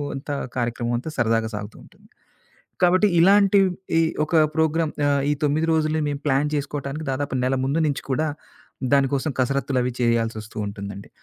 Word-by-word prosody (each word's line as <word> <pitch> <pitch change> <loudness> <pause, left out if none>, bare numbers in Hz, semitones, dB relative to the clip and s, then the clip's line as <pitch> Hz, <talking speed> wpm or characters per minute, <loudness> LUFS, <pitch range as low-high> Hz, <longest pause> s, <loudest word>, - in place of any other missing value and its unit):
అంత 135 +2 -8 0.3
కార్యక్రమం 120 0 -1
అంతా 130 +7 -5
సరదాగా 115 -2 +1
సాగుతూ 105 +1 -7
ఉంటుంది. - - -21 0.7
కాబట్టి, 185 +3 +4
ఇలాంటి 200 +2 +5 0.4
ఈ - - +5 0.2
ఒక 165 - -2 0.2
ప్రోగ్రామ్ 160 0 +1 0.2
ఆహ్, 140 -1 +2
ఈ - - +3
9 150 +2 +1
రోజులని 155 -1 +1
మేము 145 - -3
ప్లాన్ 145 +1 +2
చేసుకోవటానికి 145 +1 -4
దాదాపు 140 +1 -3
నెల 130 +1 +1
ముందు 145 +5 0
నుంచి 140 - -2
కూడా, 155 +4 0 0.7
దానికోసం 140 +2 +2
కసరత్తులవి 130 -1 0
చేయాల్సొస్తూ 115 -2 -1
ఉంటుందండి. 100 -1 -7
140 Hz, 145 wpm, -23 LUFS, 120-155 Hz, 0.7 s, ఇలాంటి